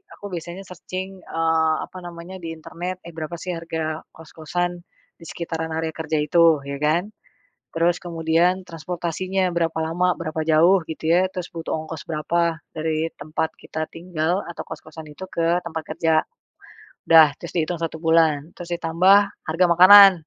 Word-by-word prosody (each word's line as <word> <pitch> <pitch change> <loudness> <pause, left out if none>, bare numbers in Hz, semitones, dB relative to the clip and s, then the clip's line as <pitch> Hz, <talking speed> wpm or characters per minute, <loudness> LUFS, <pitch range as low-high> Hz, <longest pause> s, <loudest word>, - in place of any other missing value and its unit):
aku - - -12
biasanya 175 +3 -6
searching, 185 +1 -7
eee, 160 -1 +1
apa 185 - -13
namanya 175 +1 -9
di 165 - -4
internet, 175 +3 -6
eh, 170 - -10
berapa 160 +1 -5
sih 180 - -4
harga 160 -1 -4
kos-kosan 165 +2 -3 0.5
di - - -14
sekitaran 160 -1 -4
area 160 0 -2
kerja 160 -1 -2
itu 165 0 +4
ya 140 - -3
kan. 175 +7 +1 0.6
Terus 170 +1 +2
kemudian 170 +2 +1
transportasinya 180 +3 -2
berapa 165 -1 0
lama 180 +2 +1
berapa 160 -1 -3
jauh 170 +5 +5
gitu 160 0 -3
ya 180 +2 +4
terus 180 -1 -5
butuh 165 -1 -4
ongkos 160 0 -7
berapa 165 +1 0 0.2
dari 160 +1 -1
tempat 155 +1 -2
kita 155 0 -4
tinggal 170 +1 -1
atau 170 - -6
kos-kosan 160 0 -9
itu 190 +6 -8
ke 170 +1 +1
tempat 160 -1 -4
kerja 160 0 +2 0.9
udah 160 -1 +9
terus - - -8
dihitung 170 +1 0
satu 165 -1 -4
bulan 160 -2 +3
terus 175 0 -5
ditambah 175 +3 +4 0.3
harga 165 +3 +3
makanan, 195 +3 +10
165 Hz, 155 wpm, -23 LUFS, 160-175 Hz, 0.9 s, makanan